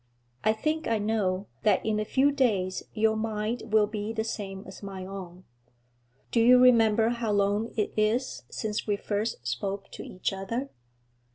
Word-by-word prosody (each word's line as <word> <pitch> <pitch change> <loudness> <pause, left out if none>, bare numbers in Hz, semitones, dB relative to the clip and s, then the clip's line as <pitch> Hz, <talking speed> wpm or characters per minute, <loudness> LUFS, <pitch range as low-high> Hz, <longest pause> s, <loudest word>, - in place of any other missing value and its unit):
I 215 - +4
think, 310 +8 -1
I 230 - +2
know, 205 -3 0 0.2
that 215 - +2
in 215 -1 +1
a 215 - -1
few 275 +6 +3
days 205 -10 +1
your 220 0 +3
mind 220 +1 -3
will 215 -1 +5
be 210 0 -4
the 220 -1 -1
same 195 -3 -5
as 190 - -11
my 195 -2 -6
own. 185 -2 -8 0.9
Do 235 - +2
you 245 +2 +7
remember 230 -3 +5
how 235 -2 -1
long 205 +2 +1
it 210 - 0
is 220 +5 0
since 215 -1 -3
we 205 - +2
first 205 - -3
spoke 195 +12 -3
to - - -8
each 185 +1 -3
other?' 230 +8 -4
215 Hz, 170 wpm, -28 LUFS, 195-230 Hz, 0.9 s, you